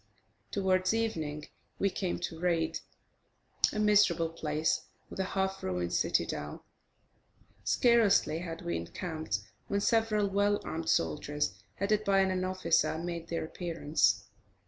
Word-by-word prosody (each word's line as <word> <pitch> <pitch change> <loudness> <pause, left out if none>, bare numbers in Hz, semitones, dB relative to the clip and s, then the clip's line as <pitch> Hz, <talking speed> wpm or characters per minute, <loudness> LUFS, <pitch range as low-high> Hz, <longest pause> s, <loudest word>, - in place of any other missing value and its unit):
Towards 185 0 +1
evening, 155 -10 -2 0.3
we 195 - +1
came 185 -2 -2
to 165 -2 -4
Raid, 165 -2 0 0.9
a - - -5
miserable 205 -6 +4
place 155 -1 -1 0.2
with - - -7
a - - +2
half 190 0 0
ruined 90 -1 -2
citadel. 75 0 -1 1.0
Scarcely 225 -9 +4
had 165 -2 -6
we 85 -1 -1
encamped, 155 - -4 0.3
when 200 - 0
several 220 -2 +2
well 205 +1 +2
armed 160 0 -4
soldiers, 145 - 0 0.2
headed 210 +2 +1
by 195 -1 +4
an 185 -1 +1
officer, 185 -3 +1
made 170 0 -4
their 165 -1 -2
appearance. 150 - +1
175 Hz, 125 wpm, -31 LUFS, 155-200 Hz, 1.0 s, miserable